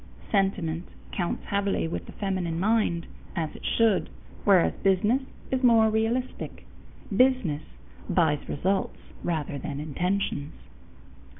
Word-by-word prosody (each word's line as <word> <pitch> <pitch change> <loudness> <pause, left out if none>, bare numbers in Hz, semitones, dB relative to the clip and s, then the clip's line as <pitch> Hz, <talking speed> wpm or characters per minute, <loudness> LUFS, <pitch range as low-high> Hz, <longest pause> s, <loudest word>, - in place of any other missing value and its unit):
Sentiment 185 -4 0 0.2
counts 175 -3 -2
heavily 200 -4 0
with 165 - -4
the - - -8
feminine 185 -5 -2
mind, 200 -4 +2 0.3
as 160 -4 -2
it - - -11
should, 225 -4 +2 0.4
whereas 190 -4 +5
business 210 +7 +3 0.3
is 260 -1 +1
more 225 -3 +6
realistic. 225 +4 -1 0.5
Business 250 - +3 0.5
buys 155 -4 +2
results 190 +6 0 0.3
rather 155 -4 -2
than 140 0 -4
intentions. 155 0 -1
190 Hz, 110 wpm, -27 LUFS, 165-220 Hz, 0.5 s, more